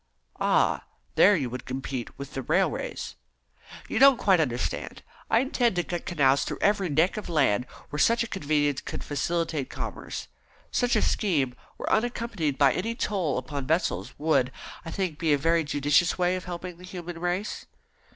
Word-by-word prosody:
"Ah, - - +2 0.3
there 205 +1 +6
you 140 -7 -1
would 125 +1 -6
compete 130 -1 -5
with 140 -1 -8
the 135 - -3
railways." 120 - -1 0.7
"You 220 - -1
don't 275 -1 +8
quite 190 -5 +4
understand. 125 -6 -2 0.3
I 225 - +4
intend 245 -5 +1
to 175 - +1
cut 175 0 -5
canals 140 -5 +3
through - - -4
every 200 -3 +2
neck 160 +8 +2
of 210 - -5
land 130 -7 +2 0.2
where 150 - -3
such 230 +5 +4
a - - -5
convenience 145 -7 0
would - - -5
facilitate 160 0 -1
commerce. - - -6 0.4
Such 245 -1 +2
a 215 - +3
scheme, 145 -11 +1 0.2
when - - -6
unaccompanied 220 - 0
by 140 -3 +5
any 225 +5 -2
toll 185 - -1
upon 135 +1 -4
vessels, 160 +3 0
would, 140 -4 +2 0.3
I 165 - -7
think, 180 -4 -3
be 160 -3 +2
a - - +4
very 165 +3 +2
judicious 145 +3 +2
way 180 0 +2
of 185 - -5
helping 180 0 -6
the - - -13
human 175 -2 -7
race." 180 +4 -2
165 Hz, 170 wpm, -27 LUFS, 140-190 Hz, 0.7 s, don't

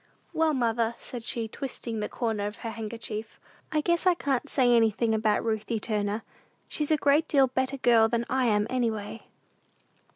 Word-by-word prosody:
"Well, 320 -2 +2
mother," 235 -2 0
said 245 -2 -8
she, 230 -1 -2
twisting 235 -2 -5
the 210 - -3
corner 220 -4 -2
of 210 - -6
her 225 - -2
handkerchief, 220 -1 -6 0.3
"I 305 - +1
guess 340 +3 +1
I 360 - +5
can't 280 -3 -1
say 245 -3 +4
anything 225 0 +2
about 215 -1 +1
Ruthie 220 0 -1
Turner; 210 0 -2 0.4
she's 300 -1 -2
a 310 - +4
great 290 +2 +3
deal 275 -2 +5
better 260 +1 -2
girl 235 -3 +5
than 235 +1 -1
I 260 -1 +1
am, 210 -2 +2
any 250 -2 +1
way." 215 0 -6
235 Hz, 175 wpm, -27 LUFS, 220-265 Hz, 0.4 s, I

